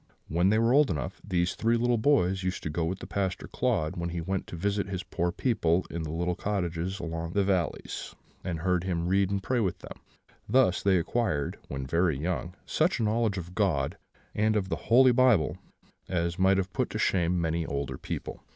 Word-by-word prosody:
When 85 +4 +2
they 110 - +3
were 115 +2 +3
old 145 0 +5
enough, 75 -7 -4
these 90 -3 0
three 115 +1 +1
little 120 0 +2
boys 95 -8 +3
used 90 0 -3
to 75 - -3
go 80 +1 -1
with 90 +3 -2
the - - -9
Pastor 95 -2 -2
Claude 105 -12 0
when 85 0 -2
he 85 0 -3
went 95 +3 -3
to - - -7
visit 100 +3 -1
his 95 -1 -3
poor 85 -2 -1
people 90 -6 +1
in 85 - -3
their 80 -1 -4
little 85 +2 0
cottages 90 -1 -2
among 85 0 -4
the 100 0 +2
valleys; 95 -5 -2 0.3
and 85 -3 -3
heard 90 -1 +1
him 85 -2 -1
read 95 +1 +2
and 100 -1 -2
pray 125 +4 0
with 95 -6 0
them. - - -11 0.5
Thus 125 -8 +4
they 95 -2 +3
acquired, 85 -5 -1
when 70 -1 -4
very 85 +1 +1
young, 90 +3 -3
such 160 -2 +1
a - - +1
knowledge 110 -1 +1
of 90 0 -6
God, 90 -10 +1 0.4
and 110 +1 +2
of 95 -3 0
the - - 0
Holy 130 +2 +7
Bible, 120 - +3 0.5
as 85 -1 -1
might 95 +1 +4
have 95 -1 -2
put - - 0
to - - -4
shame 90 -1 +1
many 85 0 0
older 70 -1 -3
people. - - -5
90 Hz, 205 wpm, -28 LUFS, 85-105 Hz, 0.5 s, Holy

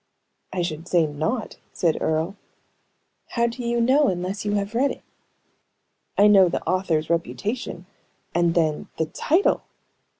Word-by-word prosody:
"I 180 - -1
should 165 0 -4
say 170 -3 +3
not," 155 - -3 0.2
said 165 -3 0
Earle. 160 +5 0 0.9
"How 235 -1 0
do 235 +1 -3
you 235 0 0
know, 270 +5 +4
unless 185 +1 -2
you 205 - 0
have 200 +1 -1
read 265 +4 +2
it?" - - -7 1.1
"I 205 - +6
know 195 -3 +7
the - - -4
author's 170 -4 0
reputation; 185 +3 -2 0.5
and 170 0 +2
then, 155 -3 +1
the 160 - +1
title!" 330 - +1
185 Hz, 140 wpm, -24 LUFS, 165-230 Hz, 1.1 s, know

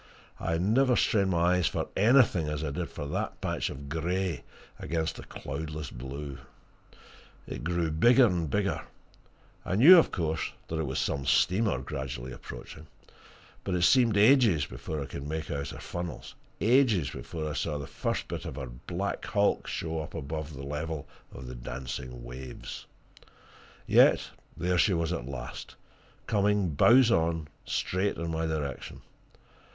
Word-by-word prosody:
I 80 - -1
never 120 +8 +3
strained 100 -5 +2
my 90 0 +3
eyes 90 - +2
for - - -2
anything 110 - +4
as 75 0 -3
I 75 - -2
did 85 +4 -3
for 75 - -6
that - - -3
patch - - -2
of 70 +1 -8
grey 85 +3 -2 0.4
against 80 -1 -2
the - - -8
cloudless 75 0 -6
blue! 70 +3 -7 1.1
It - - -7
grew 85 -1 0
bigger 120 +11 +6
and 85 -7 0
bigger 100 -4 0 0.8
I 95 - -2
knew, 165 - +10
of - - +2
course, 80 -3 -2 0.2
that 80 - -2
it 80 - -1
was 65 - -3
some 70 0 -1
steamer, 95 - +3
gradually 65 -1 -5
approaching. - - -10 0.8
But 95 - -1
it 90 - +1
seemed 115 +1 +5
ages 110 - +5
before 70 +4 -5
I - - -6
could 70 +1 -7
make 80 +1 -4
out 70 -1 -3
her - - -8
funnels; 85 -2 -6 0.3
ages 110 - +3
before 80 +1 -5
I 75 - -3
saw 75 +1 -2
the 70 - -5
first - - -3
bit - - -5
of - - -5
her 70 -2 -5 0.2
black 95 +3 -3
bulk 100 -2 +2
show 80 -1 -3
up 75 - -8
above 75 -1 -5
the 70 - -7
level 75 +1 -4 0.2
of 65 - -9
the 60 - -7
dancing 60 0 -6
waves. 60 +2 -8 1.0
Yet - - +5 0.3
there 90 +1 +1
she 95 0 +4
was 85 +1 0
at 65 -8 -4
last 65 -3 -7 0.5
coming 105 -3 +2
bows 120 - +6
on, 80 -5 +1 0.2
straight 95 +2 0
in 85 0 -3
my 80 0 -1
direction. 75 -5 -4
80 Hz, 160 wpm, -29 LUFS, 70-95 Hz, 1.1 s, knew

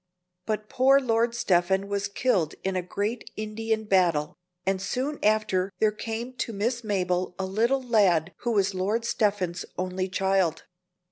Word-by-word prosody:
But 215 -1 -2
poor 270 +4 +4
Lord 235 -2 +1
Stephen 190 -2 +2
was 200 0 -1
killed 200 -6 0
in 190 0 -1
a 185 - +1
great 205 +6 -3
Indian 220 +1 -2
battle, 175 -7 +2 0.3
and 190 0 0
soon 270 +8 -2
after 205 -3 +2
there 215 +1 +3
came 225 +3 -5
to 230 - -2
Miss 235 +4 -1
Mabel 180 -3 -1
a 190 - -2
little 235 +8 +1
lad 190 -8 +3
who 240 - -1
was 200 -1 +2
Lord 205 +5 -1
Stephen's 200 -6 0
only 185 +1 -2
child. 190 -3 +1
200 Hz, 150 wpm, -26 LUFS, 185-225 Hz, 0.3 s, poor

